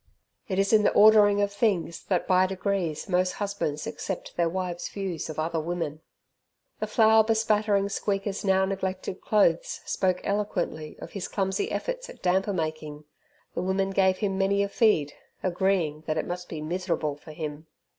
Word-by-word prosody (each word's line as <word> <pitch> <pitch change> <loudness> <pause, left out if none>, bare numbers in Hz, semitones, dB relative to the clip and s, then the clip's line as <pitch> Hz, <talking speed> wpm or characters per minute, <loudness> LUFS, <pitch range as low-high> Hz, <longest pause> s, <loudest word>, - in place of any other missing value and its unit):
It 190 - -2
is 195 +2 +2
in 215 - +7
the - - +3
ordering 205 -1 +6
of 200 0 -1
things 190 -6 0
that 185 -3 0
by 185 0 +4
degrees 190 -4 -2
most 185 -1 +1
husbands 200 -8 -3
accept 190 - -5
their 170 -1 +2
wives' 180 -1 -3
views 190 -6 -4
of 155 - -6
other 160 +1 -1
women. 160 -2 -3 0.8
The - - -2
flour 220 -1 +5
bespattering 215 -2 +2
Squeaker's 200 0 -2
now 190 -1 +3
neglected 190 -1 -3
clothes 195 -6 +2
spoke 185 -1 0
eloquently 185 -6 -2
of - - -9
his 195 -2 -4
clumsy 195 - -1
efforts - - -3
at - - -13
damper 190 +3 +2
making. 155 -4 -4 0.5
The - - -2
women 190 +1 0
gave 190 -1 +3
him 195 -2 -1
many 200 +1 +2
a 200 - -2
feed, 200 -10 +2 0.3
agreeing 175 -4 0
that 155 0 0
it 155 - -1
must 180 0 -5
be 155 - -5
miserable 165 -2 -2
for 150 +2 -13
him. 155 0 -6
190 Hz, 165 wpm, -27 LUFS, 165-200 Hz, 0.8 s, in